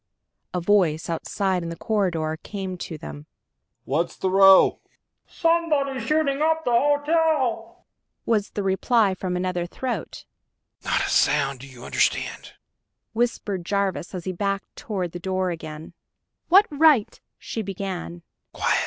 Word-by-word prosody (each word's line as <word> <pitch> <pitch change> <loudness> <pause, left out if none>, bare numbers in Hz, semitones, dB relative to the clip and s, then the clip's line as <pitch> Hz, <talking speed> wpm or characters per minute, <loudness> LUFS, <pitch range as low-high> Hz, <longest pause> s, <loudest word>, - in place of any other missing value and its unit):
A 180 - -1
voice 170 -3 +2
outside 185 +2 -1
in 170 - -5
the 170 - -5
corridor 170 -7 -1
came 190 -3 -5
to 170 -2 -7
them. 75 - -9 0.6
"What's 155 +6 -1
the 190 - -1
row?" 195 0 +6 0.5
"Somebody's 310 -6 +1
shooting 300 -2 +1
up 320 +1 +1
the 245 - +1
hotel!" 290 -3 +1 0.4
was 210 -3 +1
the 205 - -4
reply, 195 +2 +2
from 185 -1 -3
another 180 -1 -2
throat. 235 0 -5 0.6
"Not - - +1
a - - -3
sound... 135 -1 +2
do 140 - -10
you 125 -3 -12
understand?" - - -1 0.6
whispered 220 -5 -1
Jarvis, 195 -1 -2
as 180 - -5
he 185 - -1
backed 195 +2 -3
toward 195 - -4
the 175 - -7
door 185 0 -1
again. 155 -2 -8 0.6
"What 390 +4 +7
right...?" 295 -6 +4 0.2
she 225 - -5
began. 185 -3 -5
195 Hz, 135 wpm, -24 LUFS, 175-245 Hz, 0.6 s, What